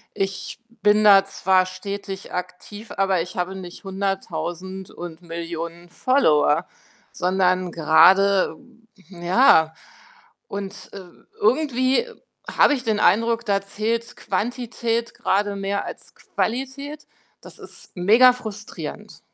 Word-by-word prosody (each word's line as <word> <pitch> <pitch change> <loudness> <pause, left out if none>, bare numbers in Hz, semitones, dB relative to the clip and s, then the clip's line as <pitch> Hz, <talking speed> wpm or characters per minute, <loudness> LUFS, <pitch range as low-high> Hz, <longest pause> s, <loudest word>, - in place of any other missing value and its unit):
Ich 195 +3 -4 0.2
bin 210 +1 +4
da 200 -2 +7
zwar 190 -1 +2
stetig 195 +1 -7
aktiv, 180 +4 -7
aber 195 -2 +2
ich 175 +2 -7
habe 180 +2 -2
nicht 180 -2 -9
100.000 190 -1 -4
und 170 -1 -9
Millionen 170 0 -7
Follower, 165 - +2 0.5
sondern 185 0 +1
grade 185 +5 +4 0.5
ja. 175 -3 +3 0.7
Und, 200 0 -7
äh, 200 - -7 0.4
irgendwie 260 - +2 0.4
habe - - +4
ich 255 - -6
den 220 -3 0
Eindruck, 230 +3 +2
da 200 -2 +1
zählt 225 +4 -3
Quantität 235 0 -2
grade 205 +1 0
mehr 200 0 -2
als - - -10
Qualität. 270 +5 -4 0.4
Das - - -13
ist - - -12
megafrustrierend. 220 +2 +1
195 Hz, 105 wpm, -22 LUFS, 180-225 Hz, 0.7 s, da